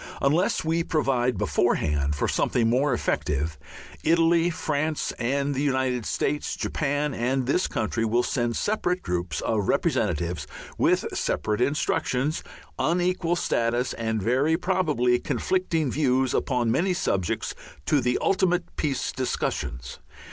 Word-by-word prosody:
Unless 155 Hz, +5 st, +1 dB
we 165 Hz, +1 st, +1 dB
provide 130 Hz, -6 st, +1 dB
beforehand 75 Hz, -2 st, +1 dB
for -, -, 0 dB
something 115 Hz, -2 st, +1 dB
more 130 Hz, +5 st, +2 dB
effective, 75 Hz, -, -1 dB, 0.4 s
Italy, 165 Hz, +1 st, +4 dB
France, 155 Hz, -2 st, -1 dB
the 140 Hz, +3 st, 0 dB
United 130 Hz, -4 st, 0 dB
States, 150 Hz, +1 st, -1 dB
Japan, 145 Hz, -1 st, -1 dB
and 130 Hz, +2 st, 0 dB
this 160 Hz, +8 st, +1 dB
country 110 Hz, +1 st, -1 dB
will 115 Hz, +2 st, +2 dB
send 120 Hz, -3 st, -1 dB
separate 185 Hz, -4 st, 0 dB
groups 90 Hz, -3 st, -2 dB
of 105 Hz, -3 st, 0 dB
representatives, 80 Hz, -1 st, 0 dB, 0.3 s
with -, -, +2 dB
separate 105 Hz, +2 st, -1 dB
instructions, 140 Hz, +1 st, 0 dB, 0.4 s
unequal 175 Hz, 0 st, +1 dB
status, 120 Hz, -5 st, 0 dB
and 110 Hz, -2 st, -2 dB
very 135 Hz, +8 st, +2 dB
probably 155 Hz, -10 st, +1 dB
conflicting 165 Hz, -7 st, 0 dB
views 130 Hz, -3 st, +1 dB
upon 125 Hz, -4 st, +1 dB
many 180 Hz, +8 st, +1 dB
subjects, 95 Hz, -, -1 dB, 0.3 s
to 135 Hz, -, +3 dB
the 125 Hz, 0 st, +1 dB
ultimate 180 Hz, -2 st, +1 dB
peace 140 Hz, -5 st, -1 dB
discussions. 70 Hz, -, -3 dB
130 Hz, 120 wpm, -25 LUFS, 115-160 Hz, 0.4 s, Italy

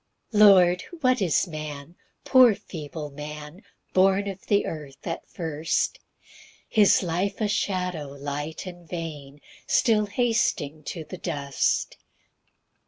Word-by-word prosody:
1 210 Hz, -2 st, +2 dB
Lord, 180 Hz, -4 st, +7 dB, 0.2 s
what 255 Hz, -3 st, +3 dB
is 175 Hz, -2 st, +2 dB
man, 155 Hz, 0 st, -7 dB, 0.3 s
poor 255 Hz, -5 st, +7 dB
feeble 155 Hz, -6 st, -7 dB
man, 150 Hz, +4 st, -8 dB, 0.3 s
Born 195 Hz, +2 st, +3 dB
of 195 Hz, -1 st, -7 dB
the 205 Hz, -1 st, +3 dB
earth 145 Hz, -4 st, -7 dB
at 165 Hz, -1 st, -4 dB
first! 160 Hz, -2 st, -1 dB, 0.7 s
His 210 Hz, -3 st, +4 dB
life 180 Hz, +3 st, -1 dB
a 215 Hz, -, +1 dB
shadow, 180 Hz, -6 st, -1 dB
light 145 Hz, +4 st, -5 dB
and 175 Hz, -2 st, -10 dB
vain, 150 Hz, -5 st, -7 dB, 0.3 s
Still 215 Hz, -3 st, +3 dB
hasting 205 Hz, -, 0 dB
to 165 Hz, -, -5 dB
the 185 Hz, +3 st, -9 dB
dust. 140 Hz, -3 st, -1 dB
170 Hz, 120 wpm, -25 LUFS, 150-200 Hz, 0.7 s, Lord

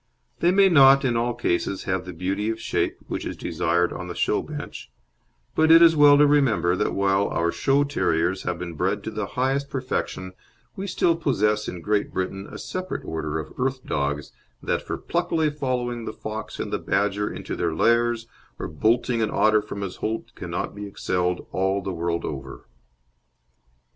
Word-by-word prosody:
They 170 Hz, -, +3 dB
may 195 Hz, +2 st, +6 dB
not 135 Hz, -5 st, +7 dB
in 120 Hz, -2 st, +1 dB
all 120 Hz, +1 st, 0 dB
cases 95 Hz, -4 st, -1 dB
have 95 Hz, -1 st, -2 dB
the 90 Hz, -, -6 dB
beauty 95 Hz, +5 st, -2 dB
of 115 Hz, 0 st, -3 dB
shape -, -, -1 dB
which -, -, -3 dB
is -, -, -5 dB
desired 90 Hz, 0 st, 0 dB
on 90 Hz, -, -6 dB
the 85 Hz, -, -6 dB
show -, -, +1 dB
bench; -, -, -8 dB, 0.6 s
but 160 Hz, 0 st, +3 dB
it 165 Hz, +1 st, +9 dB
is 165 Hz, -1 st, +7 dB
well 145 Hz, -1 st, +7 dB
to 150 Hz, -, +6 dB
remember 130 Hz, -12 st, +3 dB
that -, -, 0 dB
while 100 Hz, 0 st, +2 dB
our 85 Hz, 0 st, 0 dB
show 135 Hz, +12 st, +2 dB
terriers 95 Hz, -, 0 dB
have 90 Hz, -1 st, -2 dB
been 85 Hz, -1 st, -6 dB
bred 95 Hz, +5 st, -1 dB
to 110 Hz, -, -4 dB
the 105 Hz, -2 st, -3 dB
highest 135 Hz, +2 st, 0 dB
perfection 110 Hz, -8 st, -3 dB, 0.4 s
we 195 Hz, +1 st, -5 dB
still 170 Hz, -3 st, +2 dB
possess 105 Hz, -9 st, +1 dB
in 90 Hz, -1 st, -5 dB
Great 105 Hz, +3 st, 0 dB
Britain 95 Hz, +1 st, -3 dB
a -, -, -7 dB
separate 185 Hz, 0 st, -5 dB
order 80 Hz, -1 st, -3 dB
of 80 Hz, -, -6 dB
"earth 130 Hz, 0 st, -1 dB
dogs" 70 Hz, 0 st, -2 dB, 0.3 s
that -, -, 0 dB
for -, -, -4 dB
pluckily 165 Hz, -3 st, 0 dB
following 125 Hz, -5 st, -2 dB
the -, -, -5 dB
fox 110 Hz, 0 st, -6 dB
and -, -, -4 dB
the -, -, 0 dB
badger 100 Hz, +1 st, 0 dB
into -, -, -5 dB
their 85 Hz, -2 st, -1 dB
lairs 115 Hz, +4 st, +2 dB, 0.3 s
or -, -, -4 dB
bolting 115 Hz, -, +1 dB
an 110 Hz, -, +1 dB
otter 110 Hz, 0 st, +4 dB
from 105 Hz, -1 st, -7 dB
his 95 Hz, -2 st, -5 dB
holt 110 Hz, +1 st, -4 dB
cannot -, -, -4 dB
be 105 Hz, 0 st, -7 dB
excelled 90 Hz, -2 st, -1 dB
all 95 Hz, +1 st, +1 dB
the 95 Hz, -1 st, -4 dB
world 85 Hz, 0 st, -2 dB
over. 70 Hz, -2 st, -7 dB
105 Hz, 185 wpm, -24 LUFS, 90-135 Hz, 0.6 s, it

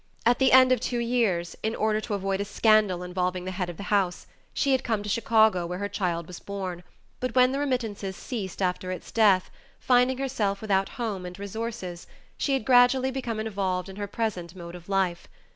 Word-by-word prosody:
At 240 Hz, +1 st, +4 dB
the 265 Hz, -, +4 dB
end 255 Hz, 0 st, +7 dB
of 255 Hz, -, +4 dB
two 245 Hz, +1 st, -2 dB
years, 230 Hz, -8 st, 0 dB
in 220 Hz, +1 st, -1 dB
order 215 Hz, 0 st, +1 dB
to 215 Hz, -, -3 dB
avoid 195 Hz, 0 st, -1 dB
a -, -, -2 dB
scandal 210 Hz, -3 st, +3 dB
involving 180 Hz, 0 st, -2 dB
the 185 Hz, -, -3 dB
head 180 Hz, -1 st, -3 dB
of 175 Hz, -, -8 dB
the -, -, -6 dB
house, 190 Hz, -3 st, +1 dB, 0.3 s
she 280 Hz, -, 0 dB
had 260 Hz, -1 st, +2 dB
come 220 Hz, -4 st, -1 dB
to 210 Hz, -, -5 dB
Chicago 220 Hz, -5 st, +3 dB
where 180 Hz, +1 st, -4 dB
her 200 Hz, +2 st, -2 dB
child 175 Hz, -4 st, -2 dB
was 180 Hz, +1 st, -9 dB
born, 190 Hz, -3 st, -5 dB, 0.4 s
but 255 Hz, -1 st, -3 dB
when 255 Hz, 0 st, +5 dB
the 275 Hz, -, -1 dB
remittances 225 Hz, -8 st, -2 dB
ceased 200 Hz, -5 st, -5 dB
after 185 Hz, 0 st, -1 dB
its 185 Hz, -, -7 dB
death, 200 Hz, -5 st, +3 dB, 0.3 s
finding 250 Hz, +1 st, +3 dB
herself 225 Hz, -7 st, -1 dB
without 195 Hz, -2 st, +1 dB
home 215 Hz, -6 st, -3 dB
and 180 Hz, 0 st, -8 dB
resources, 200 Hz, -3 st, -5 dB, 0.3 s
she 280 Hz, -, 0 dB
had 265 Hz, -5 st, 0 dB
gradually 255 Hz, +1 st, +5 dB
become 245 Hz, -4 st, -3 dB
involved 195 Hz, -4 st, -2 dB
in 190 Hz, -, -10 dB
her 205 Hz, -1 st, -3 dB
present 190 Hz, -6 st, -3 dB
mode 170 Hz, -1 st, -9 dB
of 175 Hz, +1 st, -11 dB
life. 190 Hz, -3 st, 0 dB
205 Hz, 205 wpm, -26 LUFS, 185-235 Hz, 0.4 s, end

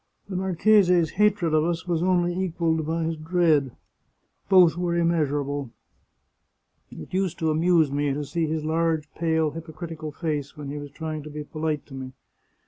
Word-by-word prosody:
The 190 Hz, -, -4 dB
marchese's 180 Hz, -2 st, +3 dB
hatred 205 Hz, -5 st, +2 dB
of 155 Hz, 0 st, +4 dB
us 165 Hz, +1 st, -2 dB
was 170 Hz, -2 st, 0 dB
only 175 Hz, -1 st, +2 dB
equalled 165 Hz, -4 st, -1 dB
by 165 Hz, +1 st, -1 dB
his 160 Hz, 0 st, -2 dB
dread. 155 Hz, -4 st, +2 dB, 0.8 s
Both 180 Hz, -4 st, +6 dB
were 175 Hz, -1 st, -1 dB
immeasurable. 145 Hz, -5 st, 0 dB, 1.2 s
It 80 Hz, -, -11 dB
used 185 Hz, -2 st, 0 dB
to 160 Hz, -1 st, 0 dB
amuse 160 Hz, -2 st, +3 dB
me 145 Hz, 0 st, 0 dB
to 145 Hz, +2 st, -3 dB
see 160 Hz, +3 st, -1 dB
his 155 Hz, 0 st, -2 dB
large, 160 Hz, -1 st, 0 dB
pale, 160 Hz, -2 st, +1 dB
hypocritical 160 Hz, 0 st, -7 dB
face 150 Hz, -3 st, -4 dB
when 145 Hz, -2 st, -6 dB
he 145 Hz, -, -5 dB
was 145 Hz, 0 st, -8 dB
trying 155 Hz, 0 st, -5 dB
to 150 Hz, -, -9 dB
be 150 Hz, 0 st, -6 dB
polite 155 Hz, 0 st, -3 dB
to 140 Hz, -, -14 dB
me. 130 Hz, -1 st, -7 dB
160 Hz, 165 wpm, -25 LUFS, 150-175 Hz, 1.2 s, Both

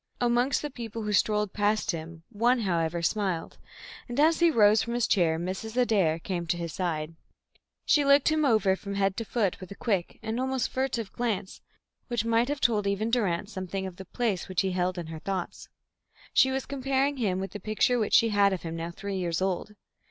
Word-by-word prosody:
Amongst 245 Hz, +3 st, +2 dB
the 295 Hz, -, -4 dB
people 230 Hz, -3 st, -6 dB
who 210 Hz, 0 st, -2 dB
strolled 210 Hz, 0 st, +1 dB
past 210 Hz, 0 st, +1 dB
him, 165 Hz, -1 st, -7 dB
one, 240 Hz, +3 st, +2 dB
however, 170 Hz, -3 st, -1 dB
smiled, 190 Hz, -3 st, -1 dB, 0.5 s
and, 245 Hz, +3 st, -3 dB
as 320 Hz, +2 st, +4 dB
he 340 Hz, 0 st, +5 dB
rose 215 Hz, -6 st, +5 dB
from 235 Hz, +1 st, -3 dB
his 240 Hz, -2 st, +2 dB
chair, 165 Hz, -5 st, +2 dB
Mrs. 190 Hz, +7 st, -5 dB
Adair 200 Hz, -10 st, +3 dB
came 175 Hz, 0 st, -4 dB
to 175 Hz, -, 0 dB
his 170 Hz, -2 st, -5 dB
side. 165 Hz, -4 st, -2 dB, 0.7 s
She 295 Hz, -, +4 dB
looked 280 Hz, +1 st, +5 dB
him 310 Hz, 0 st, +1 dB
over 215 Hz, -8 st, +3 dB
from 200 Hz, +1 st, -6 dB
head 195 Hz, -1 st, +1 dB
to 230 Hz, -, -2 dB
foot 215 Hz, -4 st, -1 dB
with 185 Hz, -, -9 dB
a 200 Hz, -, -8 dB
quick 195 Hz, -7 st, -1 dB
and 225 Hz, +2 st, -2 dB
almost 260 Hz, -1 st, -1 dB
furtive 250 Hz, -5 st, -2 dB
glance 210 Hz, -5 st, -3 dB, 0.5 s
which 235 Hz, -3 st, -1 dB
might 230 Hz, +1 st, +2 dB
have 290 Hz, 0 st, -2 dB
told 210 Hz, -4 st, +2 dB
even 205 Hz, +3 st, -1 dB
Durrance 205 Hz, -4 st, 0 dB
something 190 Hz, 0 st, -4 dB
of 185 Hz, -2 st, -7 dB
the 190 Hz, -, -9 dB
place 220 Hz, -3 st, -2 dB
which 185 Hz, -, +1 dB
he 190 Hz, -1 st, -1 dB
held 180 Hz, 0 st, -1 dB
in 175 Hz, -, -4 dB
her 160 Hz, 0 st, -7 dB
thoughts. 185 Hz, +1 st, -5 dB, 0.6 s
She 265 Hz, -, +5 dB
was 265 Hz, 0 st, -2 dB
comparing 275 Hz, +1 st, 0 dB
him 195 Hz, -7 st, 0 dB
with 195 Hz, 0 st, -4 dB
the 205 Hz, -, -7 dB
picture 215 Hz, +5 st, +1 dB
which 215 Hz, -, +2 dB
she 230 Hz, -1 st, +5 dB
had 200 Hz, -2 st, +3 dB
of 185 Hz, -, -4 dB
him 165 Hz, -1 st, -5 dB
now 165 Hz, +1 st, -4 dB
three 195 Hz, +3 st, -5 dB
years 170 Hz, -3 st, -1 dB
old. 190 Hz, +2 st, -2 dB
205 Hz, 210 wpm, -28 LUFS, 185-240 Hz, 0.7 s, he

